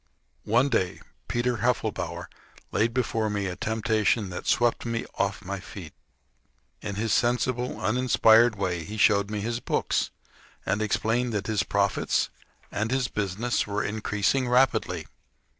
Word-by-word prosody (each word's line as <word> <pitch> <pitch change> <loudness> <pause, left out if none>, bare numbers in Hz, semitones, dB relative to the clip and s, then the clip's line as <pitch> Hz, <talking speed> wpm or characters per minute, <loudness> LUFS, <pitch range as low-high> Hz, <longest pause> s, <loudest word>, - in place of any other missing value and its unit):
One 120 +5 +4
day 95 -9 0 0.3
Peter 120 0 0
Heffelbower 120 +3 -1 0.5
laid 115 +2 +2
before 115 -3 0
me 100 -1 -1
a 90 -1 -3
temptation 110 -1 0
that 90 - -6
swept 120 -1 +2
me 115 -1 -2
off 100 -2 -1
my 100 +1 -4
feet. 90 -4 -10 0.9
In 100 - -4
his 110 +1 0
sensible, 125 +1 0
uninspired 115 -1 +4
way 90 -4 -2
he 105 +6 -7
showed 100 -1 +4
me 105 -1 -3
his 115 +2 -2
books, - - 0 0.6
and 105 - 0
explained 115 +3 0
that 100 -2 -1
his 110 -1 +1
profits 100 -2 +1 0.4
and 105 +2 -1
his 130 -1 0
business 105 +4 -1
were 105 0 -1
increasing 110 +4 0
rapidly. 115 -9 +2
110 Hz, 140 wpm, -26 LUFS, 100-120 Hz, 0.9 s, One